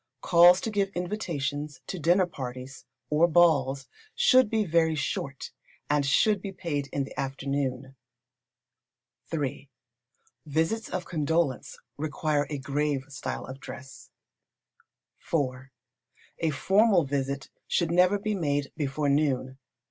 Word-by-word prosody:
Calls 175 Hz, +1 st, +7 dB
to 225 Hz, -, -3 dB
give 200 Hz, -2 st, +1 dB
invitations 150 Hz, -7 st, -3 dB
to 185 Hz, -, -5 dB
dinner 175 Hz, +4 st, +4 dB
parties, 130 Hz, -4 st, -8 dB, 0.3 s
or 155 Hz, +3 st, +5 dB
balls, 145 Hz, -6 st, +3 dB, 0.3 s
should 260 Hz, -, +5 dB
be 220 Hz, -1 st, +1 dB
very 160 Hz, -2 st, +2 dB
short, 140 Hz, -2 st, -4 dB, 0.4 s
and 145 Hz, -1 st, +2 dB
should 200 Hz, +8 st, +3 dB
be 195 Hz, -, -5 dB
paid 160 Hz, -7 st, -3 dB
in 140 Hz, -, -1 dB
the 135 Hz, -, -8 dB
afternoon. 135 Hz, -1 st, -3 dB, 1.4 s
iii. 140 Hz, -3 st, -3 dB, 0.8 s
Visits 160 Hz, +10 st, 0 dB
of 180 Hz, -1 st, -3 dB
condolence 160 Hz, -3 st, -1 dB, 0.2 s
require 150 Hz, 0 st, -1 dB
a 150 Hz, -, -3 dB
grave 140 Hz, 0 st, -1 dB
style 135 Hz, -1 st, -5 dB
of 130 Hz, +1 st, -9 dB
dress. 135 Hz, 0 st, -10 dB, 1.2 s
iv. 130 Hz, -4 st, -1 dB, 0.7 s
A 165 Hz, -, +1 dB
formal 190 Hz, -, +3 dB
visit 140 Hz, -1 st, -3 dB, 0.2 s
should 170 Hz, -2 st, +1 dB
never 180 Hz, +3 st, +4 dB
be 210 Hz, +1 st, -2 dB
made 145 Hz, -6 st, -1 dB
before 145 Hz, 0 st, -1 dB
noon. 135 Hz, -2 st, 0 dB
150 Hz, 120 wpm, -27 LUFS, 135-175 Hz, 1.4 s, Calls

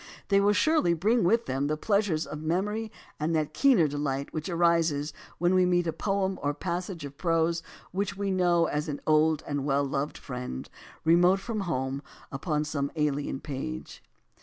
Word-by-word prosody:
They 200 Hz, -1 st, +5 dB
will 205 Hz, +1 st, +4 dB
surely 260 Hz, -, +3 dB
bring 215 Hz, +8 st, +2 dB
with 230 Hz, +7 st, +3 dB
them 135 Hz, +2 st, -1 dB
the 155 Hz, +1 st, -1 dB
pleasures 200 Hz, -4 st, +1 dB
of 150 Hz, -, -7 dB
memory 205 Hz, +7 st, -1 dB, 0.3 s
and 160 Hz, +2 st, 0 dB
that 155 Hz, -1 st, 0 dB
keener 235 Hz, -, +4 dB
delight 140 Hz, -1 st, -3 dB
which 155 Hz, +2 st, -3 dB
arises 165 Hz, -4 st, +2 dB, 0.2 s
when 175 Hz, +2 st, +2 dB
we 185 Hz, 0 st, +5 dB
meet 175 Hz, -1 st, +2 dB
a 165 Hz, -, -1 dB
poem 195 Hz, -1 st, -1 dB
or 145 Hz, -, 0 dB
a -, -, 0 dB
passage 175 Hz, -2 st, -4 dB
of 140 Hz, 0 st, -10 dB
prose 165 Hz, -1 st, +1 dB, 0.3 s
which 195 Hz, +1 st, -2 dB
we 200 Hz, -1 st, -1 dB
know 175 Hz, -2 st, +3 dB
as 150 Hz, -1 st, -2 dB
an 145 Hz, -2 st, -3 dB
old 155 Hz, 0 st, +3 dB
and 145 Hz, -2 st, -2 dB
well 140 Hz, 0 st, +2 dB
loved 140 Hz, +2 st, -2 dB
friend, 125 Hz, -, -6 dB, 0.3 s
remote 175 Hz, +4 st, +5 dB
from 220 Hz, +2 st, -4 dB
home, 135 Hz, -1 st, -2 dB, 0.3 s
upon 150 Hz, +2 st, -1 dB
some 140 Hz, -2 st, -2 dB
alien 145 Hz, -3 st, -1 dB
page. 130 Hz, -, -6 dB
165 Hz, 180 wpm, -28 LUFS, 145-185 Hz, 0.3 s, They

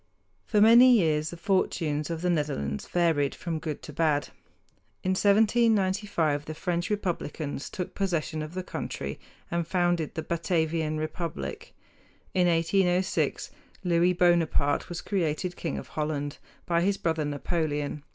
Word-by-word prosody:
For 210 Hz, -, +2 dB
many 240 Hz, +4 st, +8 dB
years 155 Hz, -5 st, +1 dB
the 170 Hz, -, -8 dB
fortunes 165 Hz, -5 st, 0 dB
of 165 Hz, 0 st, -4 dB
the 180 Hz, -, +2 dB
Netherlands 140 Hz, -, -2 dB
varied 165 Hz, -5 st, +1 dB
from 165 Hz, -3 st, -4 dB
good 155 Hz, -2 st, -5 dB
to 150 Hz, -, -9 dB
bad. 150 Hz, -2 st, +1 dB, 0.7 s
In 185 Hz, -, +1 dB
1795 200 Hz, -6 st, +2 dB
the 155 Hz, -, -6 dB
French 175 Hz, +1 st, -2 dB
Republicans 165 Hz, -8 st, -3 dB
took 180 Hz, -, -5 dB
possession 165 Hz, -5 st, -1 dB
of 155 Hz, +3 st, -7 dB
the 185 Hz, -, -3 dB
country -, -, -5 dB, 0.3 s
and 170 Hz, -1 st, -1 dB
founded 175 Hz, -3 st, 0 dB
the 160 Hz, -, -3 dB
Batavian 160 Hz, -2 st, 0 dB
republic. 155 Hz, -, -5 dB, 0.6 s
In 180 Hz, -1 st, +3 dB
1806 180 Hz, +3 st, +1 dB, 0.3 s
Louis 175 Hz, 0 st, +3 dB
Bonaparte 170 Hz, -5 st, +2 dB
was 175 Hz, -1 st, -5 dB
created 180 Hz, -2 st, -1 dB
king 165 Hz, -, -3 dB
of -, -, -7 dB
Holland 150 Hz, -1 st, -3 dB, 0.3 s
by 170 Hz, -1 st, +1 dB
his 195 Hz, +2 st, +1 dB
brother 160 Hz, -2 st, 0 dB
Napoleon. 150 Hz, 0 st, -2 dB
170 Hz, 135 wpm, -27 LUFS, 155-180 Hz, 0.7 s, many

